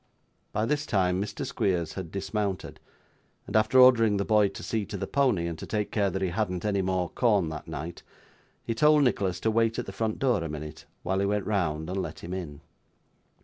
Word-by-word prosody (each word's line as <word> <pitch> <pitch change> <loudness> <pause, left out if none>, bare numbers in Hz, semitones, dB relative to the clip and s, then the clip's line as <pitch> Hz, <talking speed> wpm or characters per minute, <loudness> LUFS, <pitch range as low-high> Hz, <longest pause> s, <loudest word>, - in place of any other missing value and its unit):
By 110 +1 0
this 150 +4 -1
time 95 -4 +1
Mr. 100 0 -4
Squeers 90 -4 -1
had 95 -4 -6
dismounted; 100 0 -3 0.7
and - - -7
after 110 +4 +4
ordering 115 -5 +6
the 100 - -1
boy 105 -2 +4
to 95 - -8
see 110 -2 -1
to - - -5
the - - -3
pony, 125 -11 +1
and 85 -2 -4
to - - -7
take 105 -1 -2
care 100 -2 +1
that 95 0 -3
he 95 - +1
hadn't 90 -2 -2
any 100 -2 +1
more 95 -1 0
corn 105 -9 +2
that 75 -1 -7
night, 80 +4 -6 0.6
he 115 - -2
told 150 +5 +5
Nicholas 100 -8 +1
to 110 - +1
wait 115 0 +2
at 120 - -2
the - - -6
front 110 +2 -2
door 120 -10 +1
a 80 - -4
minute 75 0 -7 0.2
while 95 +2 0
he 100 - +1
went 105 0 0
round 80 -7 -1
and 95 +2 -2
let 85 -3 -6
him 90 - -5
in. 80 -6 -6
100 Hz, 215 wpm, -27 LUFS, 90-110 Hz, 0.7 s, ordering